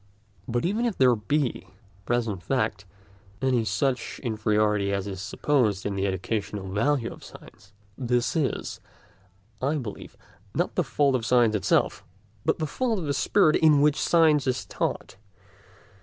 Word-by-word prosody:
But 120 +4 -1
even 215 +7 0
if 225 - -3
there 125 -2 +5
be, 145 +7 0
in - - -9 0.4
present 115 -6 -1
fact, 110 -2 -1 0.5
any 130 -2 +1
such 120 +5 -1
inferiority 105 -3 +1
as 100 -1 -1
is 95 -2 -6
supposed 105 -2 0
in 100 - -1
the 100 0 -1
educational 100 +1 -3
value 115 +4 0
of - - -15
science, 100 0 -15 0.3
this 125 +1 0
is, 150 -5 -2 0.8
I 140 +4 +1
believe, 120 -9 -7 0.4
not 175 - 0
the 180 - +1
fault 140 -1 +1
of 125 -3 0
science 120 -1 +3
itself, 105 - +1 0.4
but - - +1
the 155 - -2
fault 230 - -1
of 175 - -4
the 145 - 0
spirit 155 0 +3
in 155 -3 +5
which 150 0 +3
science 155 -5 +4
is 125 -6 -1
taught. 95 - -3
120 Hz, 155 wpm, -26 LUFS, 105-145 Hz, 0.8 s, there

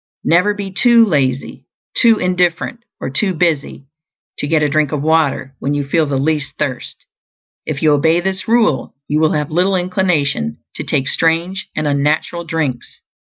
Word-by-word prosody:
Never 180 +5 +3
be 200 -2 -5
too 235 +3 +5
lazy, 135 -8 -1 0.3
too 230 -2 +5
indifferent, 180 +5 -1 0.2
or - - -4
too 185 +6 0
busy 155 -5 -1 0.5
to - - -2
get 155 0 +2
a - - +3
drink 150 0 +1
of 145 -2 -2
water 155 -4 +1
when 145 +1 -1
you 145 -1 -2
feel 155 +1 +1
the 140 -1 -1
least 150 0 -1
thirst; - - -4 0.6
if 150 -1 -3
you 155 - +5
obey 160 +4 +3
this 190 +1 -3
rule, 225 - +1
you 150 - 0
will 155 0 +2
have 150 -1 -2
little 185 +4 +2
inclination 165 - 0 0.2
to - - -5
take 135 - -1
strange 170 +5 0
and 155 - -1
unnatural 150 +4 0
drinks. 150 -7 -3
160 Hz, 165 wpm, -17 LUFS, 145-180 Hz, 0.6 s, too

